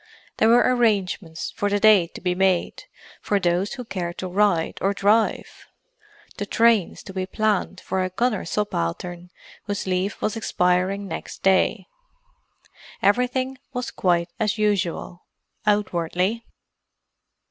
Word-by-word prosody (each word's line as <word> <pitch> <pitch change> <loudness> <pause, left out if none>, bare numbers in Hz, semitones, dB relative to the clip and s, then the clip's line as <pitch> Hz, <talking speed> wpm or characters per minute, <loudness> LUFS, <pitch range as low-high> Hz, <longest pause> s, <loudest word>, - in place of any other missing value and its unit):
There 220 - +4
were 240 +1 +6
arrangements 195 -8 0
for 205 - 0
the 205 0 +1
day 205 -5 +6
to - - -8
be 180 0 0
made 185 -1 0 0.4
for 205 - +1
those 180 +2 0
who 250 -3 -7
cared 175 -5 -4
to 185 - -4
ride 180 -3 +1
or 200 +1 +1
drive: 210 +4 +1 0.7
the - - -4
trains 225 -5 +2
to 190 - -10
be 185 -1 -3
planned 210 -2 0
for 190 0 -1
a 185 - -2
gunner 215 +3 0
subaltern 175 - -3 0.4
whose 205 -1 -3
leave 185 +1 -1
was 215 - -1
expiring 190 -1 0
next - - -7
day. 190 -1 +2 1.2
Everything 255 +4 +1
was 250 0 -3
quite 175 -2 +1
as 220 0 0
usual, 190 -4 -1 0.5
outwardly. 195 +1 0
195 Hz, 130 wpm, -23 LUFS, 180-215 Hz, 1.2 s, were